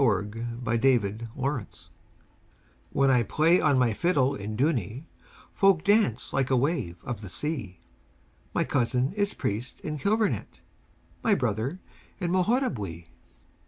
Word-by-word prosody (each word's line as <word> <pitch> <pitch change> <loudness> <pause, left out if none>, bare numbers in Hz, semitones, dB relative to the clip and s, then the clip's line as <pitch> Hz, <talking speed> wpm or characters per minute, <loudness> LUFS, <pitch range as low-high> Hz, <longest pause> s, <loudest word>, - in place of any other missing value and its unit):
THE 135 - +5 0.6
FIDDLER 115 -3 +1
OF 135 -1 -1
DOONEY 100 - -12 1.2
When 135 -1 +3
I 125 -2 +4
play 160 - +3
on 145 -3 +3
my 125 -3 +3
fiddle 140 - +2
in 105 -4 -5
Dooney, 130 - 0 0.5
Folk 195 -4 +4
dance 205 - +2
like 135 -2 +1
a 130 - +3
wave 120 - -1
of 120 -3 -5
the 100 - -8
sea; 120 - -4 0.7
My - - +1
cousin 125 +2 0
is 205 0 -1
priest 115 +5 -3
in 150 -1 -4
Kilvarnet, 215 +6 0 0.6
My 220 -3 +4
brother 125 - -2 0.4
in 175 -3 -1
Moharabuiee. 155 - 0
135 Hz, 130 wpm, -27 LUFS, 115-165 Hz, 1.2 s, THE